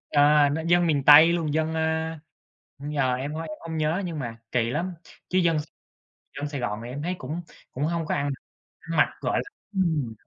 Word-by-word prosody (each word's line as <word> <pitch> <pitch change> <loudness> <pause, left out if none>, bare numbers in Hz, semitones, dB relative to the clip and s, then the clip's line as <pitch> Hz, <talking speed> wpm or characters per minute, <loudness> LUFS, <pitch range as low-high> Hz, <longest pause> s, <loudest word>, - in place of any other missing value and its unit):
ờ, 145 0 +5
nó 150 +3 -2
dân 175 0 +4
miền 145 -4 +1
Tây 155 +4 +9
luôn, 160 -4 -1
dân, 160 +1 0
à 160 0 -1 0.6
giờ 140 -3 0
em 135 +4 -4
h - - -5
em 160 -1 -5
hông 160 -1 -6
nhớ 155 +5 0
nhưng 165 -3 -4
mà 115 -4 -5
kỳ 120 -2 +1
lắm, 175 +8 -2 0.4
chứ 185 - +1
dân 170 -3 +2 0.8
dân 145 0 -3
Sài 145 -2 -4
Gòn 105 -2 -2
thì 120 - -7
em 140 +4 -5
thấy 180 +3 -2
cũng 155 +7 -5 0.3
cũng 135 - -4
hông 165 0 -1
có - - -1
ăn 140 0 -1 0.5
ăn 165 -1 -5
mặc, 150 - +5
gọi - - 0
là - - -13 0.2
ừm. 160 - 0
155 Hz, 210 wpm, -25 LUFS, 145-165 Hz, 0.8 s, Tây